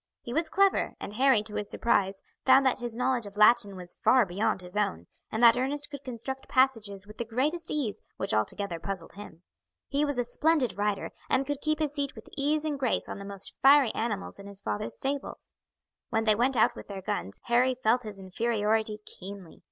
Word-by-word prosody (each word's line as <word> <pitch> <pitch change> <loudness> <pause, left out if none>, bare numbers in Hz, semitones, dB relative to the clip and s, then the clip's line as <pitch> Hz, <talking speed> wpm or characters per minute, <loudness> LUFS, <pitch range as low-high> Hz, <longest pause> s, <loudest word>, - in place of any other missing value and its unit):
He 240 - -6
was 320 +2 0
clever, 395 +2 +2
and 205 - -6
Harry, 255 -2 +4
to 210 -1 -6
his 205 -1 -3
surprise, 195 -4 +1 0.2
found 265 +1 +6
that 260 0 +2
his 240 -2 -4
knowledge 250 -3 0
of 200 0 -11
Latin 210 -2 +5
was 180 -1 -6
far 255 -3 +5
beyond 190 +1 -1
his 180 +1 -11
own, 200 - -1 0.3
and 220 +2 -1
that 235 -1 +8
Ernest 285 +4 -2
could 285 -1 -8
construct 260 +1 -6
passages 225 -7 +1
with 210 +1 -14
the - - 0
greatest 290 +9 -1
ease 270 -9 -2 0.2
which 195 - -1
altogether 170 - -1
puzzled 190 -2 -5
him. 180 -3 -11 0.5
He 285 +1 +1
was 285 -3 0
a 245 - +1
splendid 270 - +2
rider, 205 0 -1 0.2
and 265 +1 +2
could 290 0 -3
keep 310 0 +1
his 300 -2 -1
seat 285 -1 -3
with - - -12
ease 295 +2 0
and 295 -3 -2
grace 255 -3 0
on - - -6
the 200 - -8
most 200 -1 -5
fiery 275 -3 +6
animals 210 -4 -3
in 200 - -10
his 200 -1 -9
father's 205 +1 -3
stables. 275 +1 -4 0.6
When 225 -1 +1
they 215 -1 +5
went 245 +4 +1
out 220 - +4
with - - -10
their 195 -2 -7
guns 95 - -3
Harry 250 +2 +3
felt 245 0 +2
his 215 -4 -7
inferiority 215 +2 0
keenly. 190 -2 -10
230 Hz, 205 wpm, -28 LUFS, 200-270 Hz, 0.6 s, that